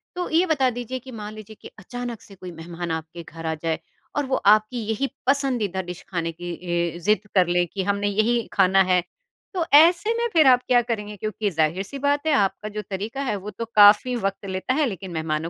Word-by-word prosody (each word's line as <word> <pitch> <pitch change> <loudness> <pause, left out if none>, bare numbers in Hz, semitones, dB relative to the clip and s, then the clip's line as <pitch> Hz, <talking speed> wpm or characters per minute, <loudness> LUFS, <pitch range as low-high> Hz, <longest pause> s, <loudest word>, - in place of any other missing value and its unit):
तो 360 0 -3
ये 335 +3 +3
बता 285 -7 +2
दीजिए 245 +1 -5
कि 260 +1 -12
मान 215 -2 -7
लीजिए 215 0 -11
कि - - -9
अचानक 240 +2 -6
से 200 - -15
कोई 185 -1 -9
मेहमान 170 +1 -6
आपके 160 +1 -5
घर 165 0 -10
आ 160 - 0
जाए, 165 -1 -1 0.4
और 290 - 0
वो 265 0 0 0.2
आपकी 215 +3 -4
यही 225 +5 0 0.2
पसंदीदा 250 -9 +1
डिश 180 -1 -8
खाने 170 -3 -2
की 175 +2 -7 0.2
ए 170 -1 -1
ज़िद 210 +4 +1
कर 185 -2 +5
लें 175 0 +2
कि, 190 +2 -4
"हमने 200 +1 0
यही 220 +3 +1
खाना 195 0 +4
है।" 180 -1 +2 0.5
तो 355 -3 -1
ऐसे 340 +8 +6
में 475 0 +1
फिर 315 -4 +5
आप 250 -1 +5
क्या 245 -1 +5
करेंगे? 210 -3 -4
क्योंकि 215 +1 -2
ज़ाहिर-सी 180 - -1
बात 285 +2 0
है - - +3
आपका 205 -2 0
जो 210 0 -5
तरीका 210 +7 -4
है 255 - -1
वो 200 +1 -6
तो 230 +4 -5
काफ़ी 215 +3 +6
वक़्त 195 -3 -3
लेता 190 +6 -2
है 300 +2 +2
लेकिन 190 -6 -5
मेहमानों 160 0 -2
210 Hz, 215 wpm, -23 LUFS, 180-250 Hz, 0.5 s, ऐसे